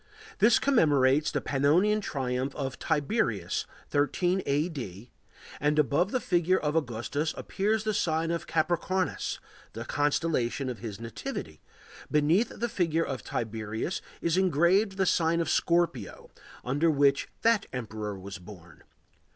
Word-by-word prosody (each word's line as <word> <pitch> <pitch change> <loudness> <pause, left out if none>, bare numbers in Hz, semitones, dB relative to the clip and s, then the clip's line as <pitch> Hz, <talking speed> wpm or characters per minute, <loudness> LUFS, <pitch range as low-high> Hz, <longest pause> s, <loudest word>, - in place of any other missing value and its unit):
This 220 +2 +6
commemorates 150 - +3
the - - -2
Pannonian 170 +10 +2
triumph 130 -4 -2
of 135 -2 -4
Tiberius, 160 +7 0 0.2
13 175 +6 +1
A.D., 135 - -2 0.5
and 150 +1 +1
above 150 +5 +2
the 255 - 0
figure 180 -3 +2
of 150 0 -1
Augustus 145 +2 -1
appears 215 +2 -1
the 215 -1 0
sign 165 -3 0
of 170 - -3
Capricornus, 175 +3 0 0.4
the 115 +2 -6
constellation 145 -2 0
of 125 - -5
his 110 -4 -6
nativity; 115 -1 -6 0.5
beneath 160 +10 +3
the 240 - -3
figure 165 -6 0
of 135 -2 -5
Tiberius 110 - -3 0.2
is 170 +1 +1
engraved 190 +3 +3
the 190 - +2
sign 170 -1 +2
of 165 -1 0
Scorpio, 170 - 0 0.3
under 145 +6 +2
which 140 -2 +3
that 230 -3 +3
emperor 110 -4 -5
was 95 0 -8
born. 90 -3 -13
150 Hz, 130 wpm, -28 LUFS, 125-175 Hz, 0.5 s, This